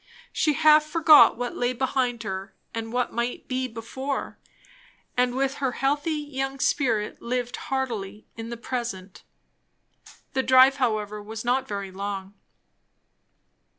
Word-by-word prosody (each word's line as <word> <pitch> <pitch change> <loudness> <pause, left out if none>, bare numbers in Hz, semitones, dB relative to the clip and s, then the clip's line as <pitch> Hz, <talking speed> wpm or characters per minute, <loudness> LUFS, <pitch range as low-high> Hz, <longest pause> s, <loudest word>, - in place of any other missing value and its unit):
She 305 -1 +2
half 305 0 +6
forgot 305 -3 +6
what 245 0 -3
lay 245 +1 0
behind 250 -2 -1
her 190 -1 -5 0.2
and 225 0 -4
what 245 0 -1
might 235 +1 -3
be 255 0 -1
before; 260 +4 -5 0.8
and 250 0 +1
with 270 +1 0
her 260 -2 0
healthy 285 +5 0
young 275 -2 -4
spirit 230 -8 0
lived 245 0 -2
heartily 220 -6 -3
in 225 0 -7
the 235 - -5
present. 230 -6 -5 1.1
The 265 - +2
drive 260 +1 +6
however 215 -5 -1
was 220 +2 -7
not 255 +2 +1
very 200 -3 -5
long. 195 0 -5
245 Hz, 130 wpm, -25 LUFS, 220-270 Hz, 1.1 s, half